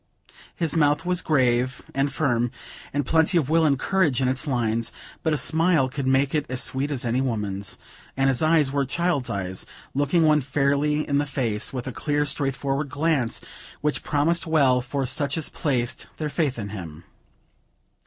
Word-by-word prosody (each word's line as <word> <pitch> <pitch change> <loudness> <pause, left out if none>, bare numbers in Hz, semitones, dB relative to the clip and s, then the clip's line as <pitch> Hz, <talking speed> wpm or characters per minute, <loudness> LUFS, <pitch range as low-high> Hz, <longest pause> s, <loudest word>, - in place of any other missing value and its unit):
His 165 -3 -1
mouth 150 -1 +2
was 180 0 +1
grave 125 -3 +1
and 135 +1 0
firm, 120 -5 +1 0.4
with 145 -1 -1
plenty 160 +5 +3
of 150 -3 0
will 165 0 +4
and 140 -2 +2
courage 165 -5 +1
in 130 - +1
its 130 +4 +1
lines, 115 -3 0 0.3
but 160 - 0
a 150 - +2
smile 160 -3 +3
could 135 0 -3
make 135 +1 +2
it 150 -1 0
as 130 -1 -1
sweet 135 +2 -1
as 135 -4 -2
any 120 +2 +1
woman's; 105 -6 -1 0.4
and 135 0 +3
his 135 -2 +2
eyes 155 -3 +3
were 140 0 +1
child's 145 -2 -1
eyes, 95 -3 -3 0.3
looking 145 +4 +2
one 150 -1 +4
fairly 145 +3 +1
in 140 -1 +2
the 145 - 0
face, 120 -6 -1
with 125 -2 -5
a 130 - -4
clear, 145 +4 0
straightforward 140 0 0
glance, 145 -4 0 0.4
which 150 0 0
promised 165 +3 +1
well 135 -6 +3
for 135 +2 -2
such 140 +3 -1
as 160 - -3
placed 125 -5 -2
their 155 -1 -2
faith 145 -3 -1
in 100 -3 -5
him. 85 -6 -8
140 Hz, 180 wpm, -24 LUFS, 125-150 Hz, 0.4 s, will